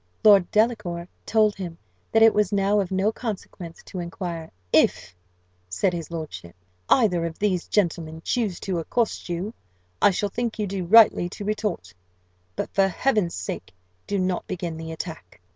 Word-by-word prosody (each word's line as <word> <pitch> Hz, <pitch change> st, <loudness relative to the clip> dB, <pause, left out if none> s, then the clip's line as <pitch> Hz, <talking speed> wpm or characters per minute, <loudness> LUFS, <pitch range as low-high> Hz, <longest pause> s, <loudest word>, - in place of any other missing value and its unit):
Lord 200 Hz, -4 st, +7 dB
Delacour 210 Hz, -6 st, 0 dB, 0.2 s
told 215 Hz, -1 st, +3 dB
him 175 Hz, -4 st, -6 dB, 0.3 s
that 225 Hz, -, +5 dB
it 225 Hz, -, +7 dB
was 210 Hz, 0 st, +2 dB
now 200 Hz, +1 st, +2 dB
of 190 Hz, -3 st, -1 dB
no 195 Hz, +3 st, +1 dB
consequence 190 Hz, -7 st, -7 dB
to 185 Hz, -, -7 dB
inquire. 170 Hz, -2 st, -5 dB, 0.2 s
"If," 90 Hz, 0 st, +3 dB, 0.5 s
said 90 Hz, -, 0 dB
his 165 Hz, -3 st, -5 dB
lordship, 155 Hz, -, -7 dB, 0.3 s
"either 190 Hz, -9 st, +4 dB
of 165 Hz, -1 st, -4 dB
these 190 Hz, -4 st, 0 dB
gentlemen 165 Hz, -5 st, -1 dB
choose 220 Hz, -8 st, -1 dB
to 185 Hz, -3 st, -2 dB
accost 220 Hz, +4 st, -1 dB
you, 180 Hz, +6 st, -3 dB, 0.5 s
I -, -, +7 dB
shall 205 Hz, +2 st, -1 dB
think 235 Hz, +2 st, -3 dB
you 210 Hz, -, -1 dB
do 190 Hz, -2 st, -3 dB
rightly 205 Hz, -3 st, +6 dB
to 200 Hz, -, -7 dB
retort; 210 Hz, -3 st, -2 dB, 0.6 s
but -, -, -4 dB
for 195 Hz, -1 st, +4 dB
Heaven's 205 Hz, -1 st, 0 dB
sake 90 Hz, 0 st, -6 dB, 0.3 s
do 205 Hz, -, -1 dB
not 185 Hz, -1 st, -1 dB
begin 175 Hz, -3 st, -4 dB
the 160 Hz, 0 st, -6 dB
attack!" 160 Hz, -, -8 dB
185 Hz, 160 wpm, -24 LUFS, 170-210 Hz, 0.6 s, Lord